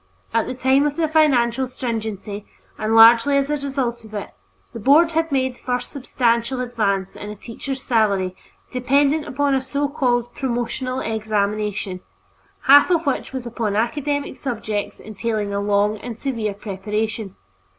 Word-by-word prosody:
At 230 -1 +1
the - - -4
time 265 +3 +3
of 290 - -3
the 330 -1 +1
financial 265 -5 +3
stringency, 220 -5 -5 0.3
and 215 +1 -1
largely 230 +5 +7
as 280 +1 0
a 295 - +1
result 265 -4 -3
of 215 -1 -11
it, 205 - -5 0.4
the 230 - -6
Board 300 +8 +5
had 325 0 0
made 260 -2 0
the - - -24
first 245 0 -2
substantial 245 -2 0
advance 210 -6 -1
in 205 - -7
a 210 - -6
teacher's 260 +5 -6
salary 200 -6 +1 0.4
dependent 280 +4 +2
upon 280 +2 0
a 265 - +2
so 280 +2 -1
called 245 -5 0
promotional 255 +1 -2
examination, 210 -3 -2 0.6
half 285 +4 +7
of 340 -2 +2
which 280 - -1
was 260 -2 -5
upon 230 -3 -2
academic 285 +5 -1
subjects 220 -5 -4
entailing 215 -1 -3
a 200 - 0
long 205 +1 +1
and 235 0 -7
severe 230 -6 -2
preparation. 210 +1 -4
240 Hz, 155 wpm, -21 LUFS, 215-275 Hz, 0.6 s, largely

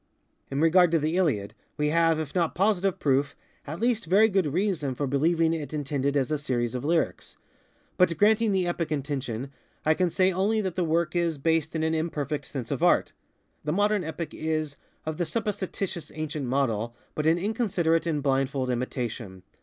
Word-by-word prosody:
In 135 - -2
regard 175 +2 +5
to - - +5
the 155 +2 0
Iliad, 140 - +1 0.2
we 150 0 +1
have, 165 0 +3
if 155 -3 -4
not 170 -3 0
positive 195 -1 +2
proof, 140 0 +1 0.3
at 160 +4 -5
least 230 -5 0
very 205 +6 +5
good 190 -7 +1
reason 165 -6 0
for 145 - -1
believing 160 +4 +2
it 155 -1 -4
intended 140 -1 -1
as 135 +1 0
a 150 - 0
series 120 -5 -1
of 125 0 -3
lyrics; 165 +2 -1 0.6
but, 170 -3 +3
granting 215 +2 +4
the 190 -2 +1
epic 170 -2 -2
intention, 135 -3 -3 0.3
I 155 - +5
can 180 +2 +1
say 185 +2 +2
only 200 +5 +1
that 190 -4 -3
the 180 - +1
work 170 +1 0
is 170 -3 +1
based 160 +2 0
in 160 - 0
an 160 0 +1
imperfect 150 -3 -2
sense 130 -5 -6
of - - -2
art. - - +3 0.5
The 150 - -1
modern 205 +1 +2
epic 160 +1 -5
is, 155 -2 -2 0.3
of 155 0 -3
the 175 - 0
supposititious 200 -5 -3
ancient 155 -3 -3
model, 120 -3 0 0.2
but 155 0 -1
an 165 +1 +4
inconsiderate 175 -5 0
and 150 -4 -1
blindfold 135 -1 0
imitation. 120 -6 -4
160 Hz, 185 wpm, -27 LUFS, 140-180 Hz, 0.6 s, regard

